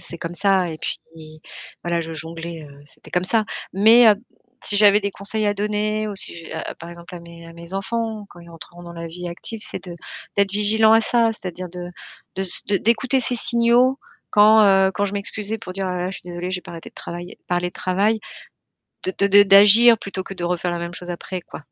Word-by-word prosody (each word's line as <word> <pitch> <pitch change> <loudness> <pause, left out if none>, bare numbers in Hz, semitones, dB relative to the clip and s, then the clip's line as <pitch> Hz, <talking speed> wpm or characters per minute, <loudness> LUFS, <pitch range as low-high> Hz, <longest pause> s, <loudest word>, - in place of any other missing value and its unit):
c'est 170 - -10
comme 165 +1 -5
ça 190 -2 +2
et 160 - -5
puis, - - -4 0.8
voilà, 170 -1 -1
je 165 0 -6
jonglais, 165 +1 -6
heu, 140 0 -16
c'était - - -17
comme 180 0 0
ça. 220 +3 +1 0.3
Mais 225 +5 +7
heu, 210 - +7 0.5
si 205 - -1
j'avais 205 0 +6
des 200 -1 -2
conseils 210 +2 -3
à 205 - +1
donner 210 +1 -1
ou 205 - -6
si, - - -7
j'a - - -5
a - - -6
par 170 - -11
exemple, 170 +1 -11
à 175 - -8
mes 170 0 -13
à 165 - -12
mes 170 +2 -10
enfants 215 +1 -3
quand 175 - -14
ils 170 - -14
rentreront 170 +1 -12
dans 170 0 -9
la 170 0 -7
vie 175 +2 -7
active, 215 +6 -8
c'est - - -4
de 175 -1 -8 0.4
d'être 200 -1 +2
vigilant 220 +2 +4
à 225 - +6
ça, 230 0 +2
c'est-à-dire 185 -3 -7
de 175 0 -8 0.5
de 190 - -1
ce 195 +2 -2
d'écouter 235 +5 +1
ces 250 0 0
signaux 240 +3 +3 0.3
quand, 215 +1 +6
heu, 195 -1 +5
quand 205 - 0
je 195 - -5
m'excusais 205 +2 -4
pour 185 - -8
dire: 195 0 -3
«Oh - - -2
là 180 - -3
là, - - -1
je - - -7
suis - - -20
désolée, 175 +1 -5
j'ai 185 -1 -3
pas - - -11
arrêté 165 -1 -9
de - - -47
travailler 175 +1 -8
parler 175 0 0
de - - -13
travail», 200 +4 0 0.9
de 185 - -1
de 200 +1 +7
d'agir 210 +4 +7
plutôt 195 -2 -6
que 195 - -8
de 180 - -7
refaire 175 0 -1
la 175 - -3
même 170 0 -5
chose 180 0 -8
après, 180 +1 -5
quoi. 155 - -11
195 Hz, 230 wpm, -21 LUFS, 175-215 Hz, 0.9 s, Mais